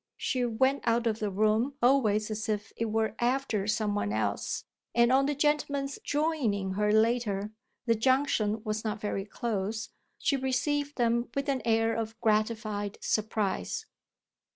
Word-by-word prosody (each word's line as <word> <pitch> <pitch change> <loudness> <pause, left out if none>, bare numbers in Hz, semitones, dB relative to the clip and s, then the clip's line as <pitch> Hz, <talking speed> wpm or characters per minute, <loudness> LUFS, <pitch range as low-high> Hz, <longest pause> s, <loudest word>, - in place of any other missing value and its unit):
She 255 -2 -1
went 260 +4 +2
out 235 +1 +2
of 225 -1 0
the 210 - -1
room 215 +7 +1
always 225 -5 +3
as 215 +2 -3
if 210 -1 -2
it 230 - -1
were 220 -1 0
after 240 -5 0
some 210 -1 +1
one 155 - -1
else; 110 +1 -2 0.3
and 235 +1 +5
on 270 +1 +4
the 290 - 0
gentlemen's 285 -1 0
"joining" 275 -11 0
her 210 +2 +1
later 220 -2 +2 0.3
the 230 - +4
junction 225 -3 +1
was 215 -1 -2
not 215 -1 -2
very 200 -2 -2
close 215 -1 -3 0.3
she 295 - +1
received 285 +3 -1
them 235 -1 +1
with 275 +1 -1
an 270 -2 0
air 225 0 +2
of 225 0 -4
gratified 215 -1 0
surprise. 210 - -1
225 Hz, 155 wpm, -29 LUFS, 210-260 Hz, 0.3 s, and